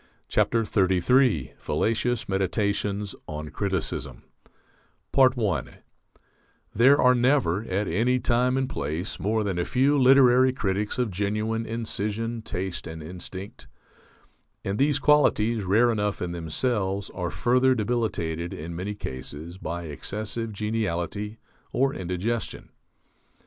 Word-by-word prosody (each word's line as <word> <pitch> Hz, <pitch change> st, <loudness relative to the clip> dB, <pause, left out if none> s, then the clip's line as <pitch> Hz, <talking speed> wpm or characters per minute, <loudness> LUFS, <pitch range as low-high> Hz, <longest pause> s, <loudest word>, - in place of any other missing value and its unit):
FALLACIOUS 110 Hz, -, +1 dB
MEDITATIONS 100 Hz, +1 st, -1 dB
ON 75 Hz, 0 st, -5 dB
CRITICISM 95 Hz, -4 st, -3 dB, 0.9 s
I 125 Hz, -7 st, +3 dB, 1.1 s
There 135 Hz, +6 st, +5 dB
are 125 Hz, 0 st, +6 dB
never, 125 Hz, -, +2 dB
at 100 Hz, +1 st, -1 dB
any 115 Hz, +9 st, +2 dB
time 125 Hz, +2 st, +2 dB
and 135 Hz, -1 st, 0 dB
place, 85 Hz, -, -4 dB
more 110 Hz, +2 st, 0 dB
than 95 Hz, -4 st, -2 dB
a -, -, +1 dB
few 135 Hz, +7 st, +2 dB
literary 130 Hz, -1 st, +6 dB
critics 105 Hz, -4 st, -1 dB
of 125 Hz, -4 st, 0 dB
genuine 105 Hz, +4 st, -1 dB
incision, 115 Hz, 0 st, -3 dB
taste, 95 Hz, -4 st, -4 dB
and 80 Hz, -1 st, -7 dB
instinct; 90 Hz, +4 st, -8 dB, 1.0 s
and 100 Hz, +2 st, -2 dB
these 145 Hz, +1 st, +3 dB
qualities, 120 Hz, -7 st, +3 dB
rare 115 Hz, +6 st, +4 dB
enough 105 Hz, -2 st, -1 dB
in 90 Hz, -, -3 dB
themselves, 95 Hz, +4 st, -2 dB
are 90 Hz, -2 st, -3 dB
further 125 Hz, +2 st, +3 dB
debilitated, 105 Hz, -8 st, -2 dB
in 85 Hz, +2 st, -6 dB
many 100 Hz, +4 st, -4 dB
cases, 75 Hz, +3 st, -6 dB
by 85 Hz, 0 st, -4 dB
excessive 105 Hz, -, -4 dB
geniality 105 Hz, 0 st, -2 dB, 0.3 s
or 135 Hz, +1 st, +1 dB
indigestion. 95 Hz, 0 st, -3 dB
105 Hz, 110 wpm, -26 LUFS, 90-120 Hz, 1.1 s, are